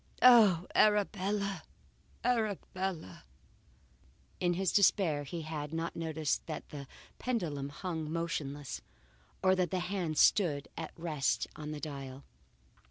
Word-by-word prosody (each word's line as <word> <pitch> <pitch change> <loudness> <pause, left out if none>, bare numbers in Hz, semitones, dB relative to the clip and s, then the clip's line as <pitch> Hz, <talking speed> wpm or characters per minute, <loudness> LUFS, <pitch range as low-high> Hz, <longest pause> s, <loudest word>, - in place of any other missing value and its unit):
Oh! 215 -9 +7
Arabella, 200 -2 +2 0.6
Arabella!" 195 - -2 1.2
In 175 -1 +1
his 190 0 +1
despair 175 -7 +3
he 165 +3 -5
had 150 -1 -5
not 165 +1 -3
noticed 160 -2 -1
that 155 -2 -6
the 140 -2 -7 0.3
pendulum 160 - -2
hung 160 +1 -4
motionless, 145 -6 -3 0.6
or 185 0 +5
that 180 -1 +1
the 185 - -1
hands 180 -3 -1
stood 155 -8 +4
at 160 - -5
rest 155 -5 0
on 150 -1 -6
the 150 -1 -4
dial. 140 -3 -7
165 Hz, 115 wpm, -32 LUFS, 150-190 Hz, 1.2 s, Oh